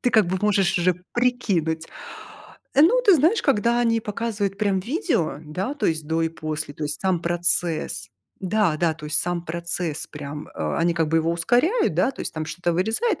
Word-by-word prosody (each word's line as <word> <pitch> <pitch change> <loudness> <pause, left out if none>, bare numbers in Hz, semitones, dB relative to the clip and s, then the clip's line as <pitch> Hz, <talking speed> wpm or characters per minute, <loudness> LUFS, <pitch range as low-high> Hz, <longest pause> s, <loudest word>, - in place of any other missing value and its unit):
ты, 245 - +1
как 220 -4 +4
бы, 185 +2 -1
можешь 195 -3 +2
уже 180 +1 +2 0.2
прикинуть. 195 -11 0 0.9
Ну, 355 - +5
ты 400 -5 +7
знаешь, 325 - +3
когда 235 -2 +2
они 230 -1 +2
показывают, 210 -2 -3
прям, 200 -2 +1
видео, 275 - -1
да, 185 - -3
то 290 - -1
есть, 160 -2 -1
до 165 +1 0
и 165 - +1
после, 155 -2 -5
то 155 - -4
есть, 145 0 -3
сам 185 -3 +1
процесс, 170 - -1 0.3
да-да, 175 -5 +1
то 150 -1 -9
есть, 155 +1 +1
сам 175 -1 -2
процесс 170 -1 -3
прям, 150 0 -8
э, 75 -1 -3
они, 170 0 +2
как 165 -2 +1
бы, 165 +1 +3
его 165 +1 +1
ускоряют, 245 - +2
да, - - +2
то 265 - -11
есть, - - -3
там 155 -1 -3
что-то 175 +2 -2
вырезает, 220 - 0
175 Hz, 190 wpm, -23 LUFS, 160-230 Hz, 0.9 s, ты